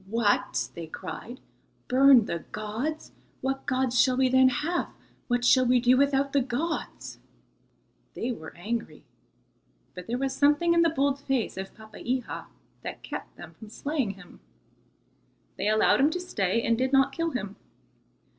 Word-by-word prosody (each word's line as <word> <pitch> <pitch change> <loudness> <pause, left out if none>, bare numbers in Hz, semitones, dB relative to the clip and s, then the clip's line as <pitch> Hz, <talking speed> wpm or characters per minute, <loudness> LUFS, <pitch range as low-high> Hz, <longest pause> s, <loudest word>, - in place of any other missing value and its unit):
"What!" 205 - +1
they 170 -1 -7
cried, 220 +9 -8 0.5
"burn 260 -2 +6
the 170 - -3
gods! 225 +9 -4 0.3
What 270 +1 -3
gods 255 -1 +2
shall 255 -1 +2
we 260 -1 +3
then 260 0 +5
have? 315 +7 -1 0.4
What 245 -1 0
shall 255 +1 +6
we 250 0 +4
do 245 +1 +4
without 275 0 +2
the 280 - +3
gods?" 270 +7 -4 1.0
They 245 - -2
were 160 -10 -9
angry, 210 -4 -4 0.9
but 180 - -9
there 240 +2 -1
was 270 +1 -2
something 295 +4 +3
in 340 - +4
the 335 - +4
bold 280 -2 0
face 270 -4 -1
of 190 +1 -7
Papeiha 235 +3 -5 0.4
that - - -7
kept - - -7
them - - -11
from 220 - -11
slaying 265 -4 -2
him. 185 -2 -15 1.2
They - - -1
allowed 215 0 +4
him 280 +3 +5
to 360 - -3
stay, 230 - -1
and 230 - +2
did 260 +3 0
not 270 0 +4
kill 330 +3 -1
him. 205 -8 -5
255 Hz, 155 wpm, -27 LUFS, 220-275 Hz, 1.2 s, burn